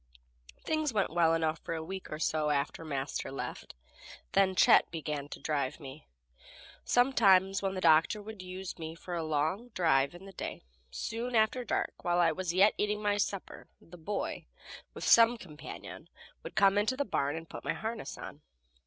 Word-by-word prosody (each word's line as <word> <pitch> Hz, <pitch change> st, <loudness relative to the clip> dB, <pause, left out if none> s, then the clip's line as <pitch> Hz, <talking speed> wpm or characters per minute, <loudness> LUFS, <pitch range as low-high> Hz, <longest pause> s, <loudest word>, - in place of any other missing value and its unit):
Things 310 Hz, -2 st, 0 dB
went 200 Hz, -7 st, 0 dB
well 165 Hz, -1 st, +4 dB
enough 160 Hz, -1 st, 0 dB
for 165 Hz, -, -4 dB
a 160 Hz, -, -4 dB
week 190 Hz, +3 st, -7 dB
or 155 Hz, -, -3 dB
so 155 Hz, -1 st, 0 dB
after 145 Hz, +2 st, -1 dB
Master 140 Hz, -4 st, -3 dB
left, 135 Hz, -, -6 dB, 0.6 s
then 190 Hz, -1 st, +3 dB
Chet -, -, +6 dB
began 150 Hz, -3 st, -4 dB
to -, -, -8 dB
drive 145 Hz, -3 st, -2 dB
me. 140 Hz, 0 st, -11 dB, 0.8 s
Sometimes 195 Hz, -7 st, +4 dB
when 195 Hz, -1 st, -1 dB
the 185 Hz, -, -3 dB
doctor 165 Hz, +6 st, +4 dB
would 210 Hz, -1 st, -9 dB
use 185 Hz, 0 st, -7 dB
me 160 Hz, 0 st, -6 dB
for 175 Hz, +2 st, -8 dB
a 170 Hz, -, -1 dB
long 155 Hz, +8 st, -1 dB
drive 160 Hz, -4 st, +2 dB
in 180 Hz, +2 st, -12 dB
the 195 Hz, -, -11 dB
day, -, -, -6 dB, 0.3 s
soon 230 Hz, -, -4 dB
after 220 Hz, +3 st, +2 dB
dark, 235 Hz, -, -2 dB
while 175 Hz, -1 st, +1 dB
I 170 Hz, -2 st, +4 dB
was 185 Hz, +1 st, -2 dB
yet 190 Hz, +4 st, +5 dB
eating 210 Hz, 0 st, 0 dB
my 205 Hz, -1 st, +2 dB
supper, 200 Hz, -1 st, -3 dB
the 170 Hz, -, -15 dB
boy, 180 Hz, +5 st, -4 dB, 0.5 s
with -, -, -7 dB
some 230 Hz, +1 st, +6 dB
companion, 155 Hz, -8 st, -10 dB, 0.3 s
would -, -, -9 dB
come 195 Hz, 0 st, +5 dB
into 220 Hz, +5 st, 0 dB
the 285 Hz, -, 0 dB
barn 145 Hz, -7 st, -1 dB
and 165 Hz, 0 st, -7 dB
put -, -, -9 dB
my -, -, -1 dB
harness 225 Hz, +1 st, -5 dB
on. 145 Hz, -, -9 dB
180 Hz, 180 wpm, -31 LUFS, 155-205 Hz, 0.8 s, Chet